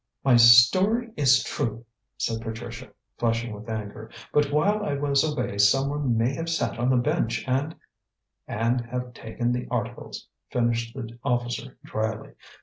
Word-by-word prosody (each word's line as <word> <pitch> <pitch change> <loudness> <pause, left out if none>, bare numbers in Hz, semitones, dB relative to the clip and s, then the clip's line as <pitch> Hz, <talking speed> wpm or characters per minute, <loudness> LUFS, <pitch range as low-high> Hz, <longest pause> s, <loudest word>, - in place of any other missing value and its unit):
"My 130 -2 +5
story 185 - +6
is 130 -4 +4
true," 115 +1 -3 0.3
said 115 -1 -2
Patricia, 115 +1 -7 0.3
flushing 115 -1 -1
with 105 +2 -10
anger. 110 0 -6 0.2
"But 145 -1 +2
while 205 +9 +2
I 145 - -1
was 140 -1 +2
away 125 -9 -2
someone 135 +4 +2
may 115 +4 +1
have 165 +3 -4
sat 160 -7 -1
on 120 +1 +1
the 130 - +3
bench 120 -3 -1
and 135 +5 -1 0.4
" - - -58
"And 115 +3 0
have 125 +1 -5
taken 120 +1 -3
the 125 0 -2
articles," - - -5 0.2
finished 115 -1 -1
the 115 +1 -8
officer 120 +1 -2
dryly. 110 0 -3
120 Hz, 150 wpm, -25 LUFS, 115-140 Hz, 0.4 s, story